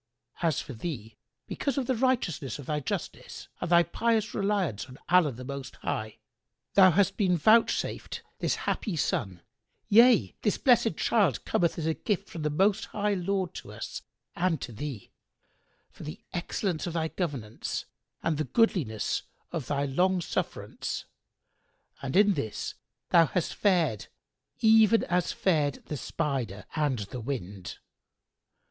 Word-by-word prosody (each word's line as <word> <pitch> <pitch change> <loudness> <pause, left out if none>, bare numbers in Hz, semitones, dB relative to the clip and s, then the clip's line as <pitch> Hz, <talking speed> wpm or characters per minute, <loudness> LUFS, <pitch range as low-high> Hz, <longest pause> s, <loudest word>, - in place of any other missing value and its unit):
As 165 -4 +2
for 135 - -6
thee, 115 -3 -6 0.3
because 280 -2 -2
of 270 - 0
the 260 - +1
righteousness 230 - 0
of 145 - -9
thy 150 +2 -1
justice 140 - -5
and 175 - -3
thy 170 0 +6
pious 220 +5 0
reliance 195 - 0
on 130 -1 -12
Allah 175 -5 +5
the 125 +1 -9
Most 140 0 -6
High, 110 0 -4 0.6
thou 190 -2 +8
hast 190 +3 +2
been 185 -4 +3
vouchsafed 220 +8 +2 0.2
this - - +1
happy 205 -7 -1
son; 95 - -1 0.5
yea, 225 - +6
this - - +1
blessed[FN#93] - - +3
child - - +2
cometh 170 -2 +1
as 160 - -2
a 160 - +2
gift 205 +3 -2
from 165 - -6
the 150 - 0
Most 195 +7 +2
High 205 0 -1
Lord 190 -1 -1
to - - -8
us - - -6 0.3
and 170 -3 +1
to - - -5
thee, 120 -1 -6 0.8
for - - -15
the 150 - -7
excellence 175 -1 -2
of 170 - -3
thy 160 -1 -1
governance 135 - -4 0.4
and 155 -3 0
the 155 - 0
goodliness 170 - +1 0.3
of 160 -7 -4
thy 145 0 0
long 180 +7 +2
sufferance; 170 - -3 1.0
and 135 -1 -4
in 205 +1 +6
this 115 - -3 0.4
thou 165 -2 +6
hast 180 - -1
fared 170 - +1 0.5
even 220 0 +6
as 180 0 0
fared 150 -7 +1
the 150 - -4
Spider 125 - -3
and 145 -4 +1
the 125 - -4
Wind." 100 -7 -5
165 Hz, 150 wpm, -28 LUFS, 135-195 Hz, 1.0 s, thou